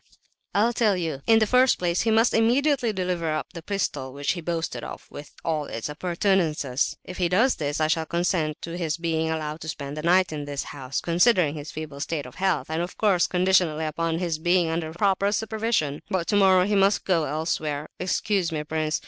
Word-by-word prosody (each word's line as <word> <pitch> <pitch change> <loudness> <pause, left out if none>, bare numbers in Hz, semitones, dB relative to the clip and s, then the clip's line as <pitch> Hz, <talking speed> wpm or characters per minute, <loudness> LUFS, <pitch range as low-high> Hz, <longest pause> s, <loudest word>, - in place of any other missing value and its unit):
"I'll 225 +4 +3
tell 215 -5 +2
you. 160 -6 -3
In 225 - +6
the 220 - +4
first 255 +3 +4
place 175 -1 0
he 225 - +1
must 225 +1 +3
immediately 245 +2 +2
deliver 180 -4 -2
up 155 - -4
the 170 - -7
pistol 150 -8 -3
which 140 0 -1
he 175 - -4
boasted 165 0 -3
of, - - -8
with 145 0 -10
all 155 -3 0
its 115 0 -5
appurtenances. 165 -5 0
If 185 - -9
he 175 -2 +2
does 225 +9 +3
this 145 0 -2
I 155 - +3
shall 160 0 0
consent 170 -3 0
to 170 0 -5
his 160 -2 -1
being 160 -1 -1
allowed 155 -1 -3
to 160 - -7
spend 140 -1 -5
the 155 - -4
night 180 +1 +3
in 145 -1 -4
this 145 -1 -4
house—considering 170 - +1
his 150 -1 -7
feeble 150 -2 -7
state 150 -1 -3
of 125 - -11
health, 190 -5 +1
and 160 +1 -1
of 175 - -5
course 195 -5 +3
conditionally 180 -4 +2
upon 165 +1 -1
his 170 -3 -2
being 175 0 +2
under 160 -1 -2
proper 195 +3 +1
supervision. 220 -9 -1
But 185 -4 -1
tomorrow 190 -2 +4
he 210 - -1
must 195 0 +3
go 170 -5 +2
elsewhere. 150 0 -2
Excuse 185 -1 0
me, 155 -2 -2
prince! 155 0 -1
170 Hz, 200 wpm, -25 LUFS, 155-190 Hz, -, In